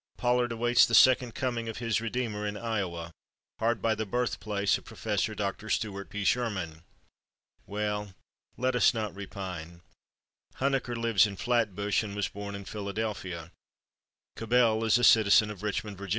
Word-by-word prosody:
Pollard 120 0 +1
awaits 120 +1 +4
the 115 - +2
Second 125 -2 +5
Coming 120 -3 -2
of 110 - -6
his 115 -2 0
Redeemer 115 -3 -2
in 105 0 -4
Iowa, 95 -7 -3 0.5
hard 115 -2 0
by 115 - +3
the 110 0 -2
birthplace 105 -3 0
of - - -20
Prof. 105 -1 -1
Dr. 105 +1 -3
Stuart 100 -2 -2
P. 105 +1 -4
Sherman. 95 -9 -1 0.9
Well, 105 -1 -3 0.4
let 130 +1 0
us 125 - +4
not 105 -4 -2
repine. 90 -4 -7 0.7
Huneker 135 -2 0
lives 115 -3 +3
in 100 - -7
Flatbush 105 -3 0
and 105 -2 -6
was 105 -1 0
born 100 0 -7
in 100 -1 -8
Philadelphia. 100 -5 -4 0.8
Cabell 115 -1 +2
is 110 +1 +4
a 120 - -1
citizen 105 -2 +6
of 100 - -10
Richmond, 105 -1 -3
Va. 100 -1 -7
105 Hz, 150 wpm, -29 LUFS, 100-115 Hz, 0.9 s, citizen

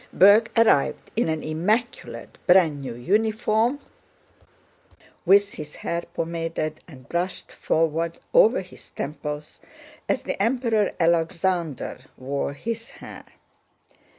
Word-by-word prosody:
Berg 205 +4 +6
arrived 225 -11 +3
in 225 -6 +1
an 160 -1 -2
immaculate 210 +11 -2
brand 165 -6 +5
new 125 -4 -6
uniform, 220 - +1 1.5
with 200 +2 +5
his 150 -1 -8
hair 170 0 -3
pomaded 165 -2 -3
and 130 -7 -14
brushed 175 +2 -3
forward 165 +1 0 0.2
over 225 -1 +5
his 185 - -14
temples 150 +1 -6 0.5
as - - 0
the - - -3
Emperor 230 -2 +1
Alexander 170 -3 0 0.2
wore 140 +2 -3
his 230 +8 -5
hair. - - -11
170 Hz, 105 wpm, -24 LUFS, 155-215 Hz, 1.5 s, Berg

